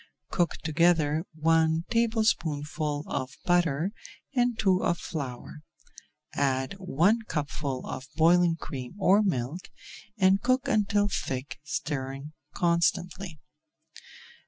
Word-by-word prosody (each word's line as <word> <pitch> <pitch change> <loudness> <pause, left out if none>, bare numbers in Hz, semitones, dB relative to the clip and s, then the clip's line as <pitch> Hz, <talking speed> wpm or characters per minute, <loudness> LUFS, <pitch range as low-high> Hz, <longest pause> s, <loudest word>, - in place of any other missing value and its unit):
Cook 175 -2 +1
together 160 0 +2
one 160 0 +2
tablespoonful 155 - 0
of 130 0 -4
butter 175 0 +2 0.4
and 245 -3 +1
two 190 -4 +2
of 170 - +1
flour, 140 -2 -6 0.7
add 135 0 0
one 185 +5 +2
cupful 145 -3 -3
of 130 - -6
boiling 170 +1 +4
cream 135 -2 -7
or 195 +1 +4
milk, 165 - -2 0.5
and 190 0 +4
cook 255 +2 +1
until 205 -4 +2
thick, 130 -9 -4
stirring 140 -1 -4 0.2
constantly. 175 0 0
165 Hz, 100 wpm, -28 LUFS, 145-190 Hz, 0.7 s, boiling